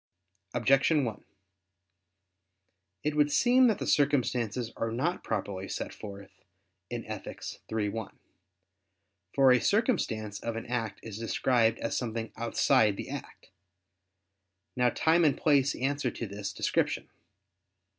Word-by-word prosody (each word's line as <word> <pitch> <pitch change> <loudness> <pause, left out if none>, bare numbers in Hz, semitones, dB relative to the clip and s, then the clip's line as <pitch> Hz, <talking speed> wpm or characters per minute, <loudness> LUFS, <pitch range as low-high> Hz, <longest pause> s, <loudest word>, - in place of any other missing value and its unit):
Objection 135 +4 +3
1: 110 -3 -5 1.8
It 150 0 -1
would 150 -1 +3
seem 250 - +5
that 220 -4 +2
the - - -4
circumstances 125 -5 +1
are 115 - -2
not 150 +10 -1
properly 100 -3 -3
set - - -4
forth 100 -2 -9 0.6
in - - -5
Ethic. - - -7 0.3
iii, 110 -2 0
1. 105 0 -6 1.2
For 135 -2 +6
a 125 - +5
circumstance 125 - 0
of 115 -1 -4
an 115 - -5
act 115 -2 -3
is 110 -2 -7
described 115 0 +2
as - - -3
something 115 -2 -3
outside 110 -2 +2
the - - -6
act. - - -9 1.2
Now 125 -1 +3
time 160 +7 +3
and 150 -4 +3
place 140 -2 +3
answer 140 0 -1
to 115 - -5
this 100 -1 -5
description. - - 0
120 Hz, 125 wpm, -29 LUFS, 110-145 Hz, 1.8 s, For